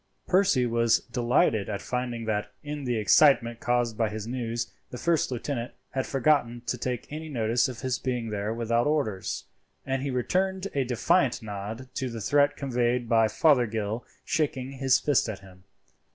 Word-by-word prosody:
Percy 185 -9 +3
was 115 -1 +2
delighted 120 - +1
at 100 -2 -2
finding 125 -2 -3
that, 105 -1 -2
in 145 -1 -5
the 120 -1 0
excitement 115 +1 +4
caused 120 -3 0
by 110 -2 +2
his 105 0 -5
news, 120 -1 -3 0.2
the 125 - -7
first 165 +3 +1
lieutenant 125 -1 -3 0.2
had 130 - -2
forgotten 125 -3 +1
to 125 - -1
take 125 0 -3
any 155 +1 -6
notice 120 -1 +1
of 125 -2 -8
his 130 -2 -1
being 125 -4 -2
there 105 +1 -2
without 115 +2 +1
orders: 140 -11 -1 0.4
and 135 0 -1
he 140 - -2
returned 185 +9 0
a 140 - +1
defiant 125 +1 +2
nod 105 +4 -6
to 130 - -2
the 115 -1 -6
threat 145 +6 +2
conveyed 125 -2 0
by 115 -1 +4
Fothergill 115 -5 +2 0.2
shaking 145 -3 -1
his 135 -1 +3
fist 145 -5 +2
at 100 -3 -6
him. 95 -1 -16
120 Hz, 165 wpm, -27 LUFS, 115-135 Hz, 0.4 s, excitement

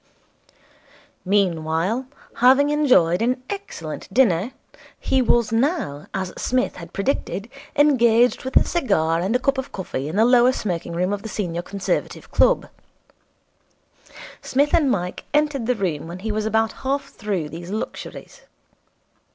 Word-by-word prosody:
Meanwhile, 185 +4 0 0.3
having 270 +4 +5
enjoyed 250 - +3
an 250 +2 0
excellent 200 - -7
dinner, 210 -2 +3 0.5
he 265 - +1
was 235 -3 +2
now, 225 - -1
as 190 -2 -4
Psmith 255 0 0
had 170 -1 -10
predicted, 200 -2 -2 0.3
engaged 245 -5 +4
with 260 - +1
a - - +6
cigar 170 - +1
and 190 +7 0
a - - +3
cup 275 +1 +1
of 265 - -6
coffee 145 -8 -4
in 155 - -5
the 220 +2 +4
lower 245 +1 +5
smoking 175 -7 -3
room 180 +3 0
of 205 - -3
the 220 - -7
Senior 175 -5 -3
Conservative 195 +2 -3
Club. - - +3 1.7
Psmith 285 +3 +1
and 305 -5 +4
Mike 180 -6 -2
entered 295 -5 +1
the 250 - +2
room 170 -7 -2
when 170 +2 -7
he 215 +4 -4
was 215 0 -1
about 220 0 +1
half 275 +1 -2
through 195 -8 -3
these 170 +2 -8
luxuries. 215 +3 -6
220 Hz, 145 wpm, -22 LUFS, 180-260 Hz, 1.7 s, a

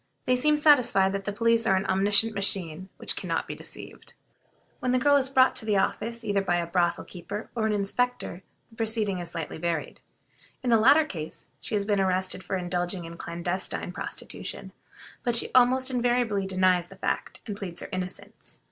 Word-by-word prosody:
They 255 - +3
seem 300 +4 +3
satisfied 250 -11 +4
that 195 0 -3
the 205 - -1
police 230 +2 +2
are 190 - +4
an 190 +1 0
omniscient 205 +3 +3
machine 190 -3 -1
which - - -2
can - - -6
not - - -1
be - - -4
deceived. - - -10 0.6
When 250 - -2
the 255 - +3
girl 285 +3 +4
is 270 -2 +3
brought 260 -1 +4
to - - -2
the 210 -2 +3
office 230 +4 -1
either 200 -2 +1
by 180 -2 0
a 175 -1 0
brothel 175 0 0
keeper 200 +4 -7
or 220 -2 0
an - - 0
inspector, 205 -2 -1 0.3
the - - -17
proceeding 220 -4 -1
is 175 - -5
slightly 160 -1 -5
varied. 170 -2 -3 0.6
In 245 - +1
the 230 - +7
latter 285 +8 +6
case 160 - -7
she - - -4
has 200 -1 0
been 205 -1 +1
arrested 185 0 0
for 190 - -2
indulging 175 0 -2
in 165 0 -8
clandestine 175 +2 -3
prostitution, - - -6 0.5
but 240 -2 0
she 235 - +2
almost 255 +1 +4
invariably 240 -5 +1
denies 185 -2 +2
the 195 - -13
fact, 190 - -3
and 205 - -4
pleads 180 -4 -4
her - - -7
innocence. 185 -1 -7
200 Hz, 190 wpm, -27 LUFS, 185-235 Hz, 0.6 s, the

